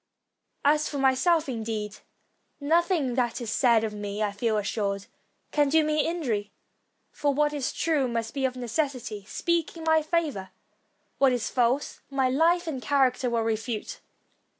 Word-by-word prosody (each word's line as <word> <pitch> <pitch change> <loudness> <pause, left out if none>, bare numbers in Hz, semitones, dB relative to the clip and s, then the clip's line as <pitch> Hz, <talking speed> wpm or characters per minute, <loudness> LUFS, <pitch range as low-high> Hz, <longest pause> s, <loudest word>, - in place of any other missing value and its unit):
As 300 +1 +3
for 290 - -4
my 265 -1 +4
self, 325 +3 +2
indeed, 220 -4 -4 0.6
nothing 320 -2 +1
that 240 -1 0
is 235 -3 -4
said 235 -4 +4
of 220 -1 -2
me, 205 0 -3
I 205 - 0
feel 215 +2 0
assured, 200 -1 -2 0.5
can 295 -2 +2
do 315 +2 +4
me 305 0 +1
injury; 240 -12 -2 0.6
for 285 -2 0
what 295 +1 +2
is 285 -3 -2
true 300 -5 +1
must 230 0 -3
of 265 -2 0
necessity 245 -4 -3
speak 340 - -1
in 325 - -8
my 320 0 +4
favor; 305 - -1 0.7
what 270 -1 +5
is 245 -3 -1
false, 250 +3 0
my 270 -2 +1
life 335 +6 +3
and 290 -6 -4
character 255 0 +2
will 230 -1 0
refute. 225 - -3
260 Hz, 155 wpm, -27 LUFS, 225-305 Hz, 0.7 s, what